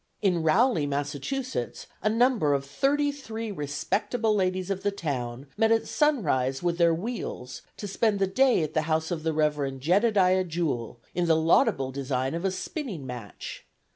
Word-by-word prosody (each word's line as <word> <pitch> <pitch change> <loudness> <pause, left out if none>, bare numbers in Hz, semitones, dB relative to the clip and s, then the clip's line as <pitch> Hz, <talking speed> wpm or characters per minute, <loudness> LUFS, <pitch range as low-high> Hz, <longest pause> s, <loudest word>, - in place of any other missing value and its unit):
In 180 -4 +2
Rowley, 165 - +3
Massachusetts, 145 - -3 0.2
"A 215 - +2
number 225 - +3
of 140 0 -2
thirty 285 - +1
three 225 -6 -6
respectable 200 - -1
ladies 185 -1 0
of 195 -1 -2
the 205 - +1
town 135 -9 -4
met 225 0 +3
at 225 0 +2
sunrise 150 - +1
with 175 0 0
their 170 -1 +5
wheels 165 - -4 0.2
to 205 - -5
spend 210 +1 +1
the 195 - +2
day 250 0 +3
at 155 0 -4
the 155 - +2
house 160 +1 0
of 165 -2 -2
the 160 0 0
Rev'd 150 -3 0
Jedidiah 185 - +3
Jewell, 155 -9 -2
in 175 0 0
the 165 - +5
laudable 160 - +3
design 130 0 -2
of 170 +1 -3
a 195 - +2
spinning 190 - -5
match. 125 -5 -8
175 Hz, 170 wpm, -27 LUFS, 145-220 Hz, 0.2 s, their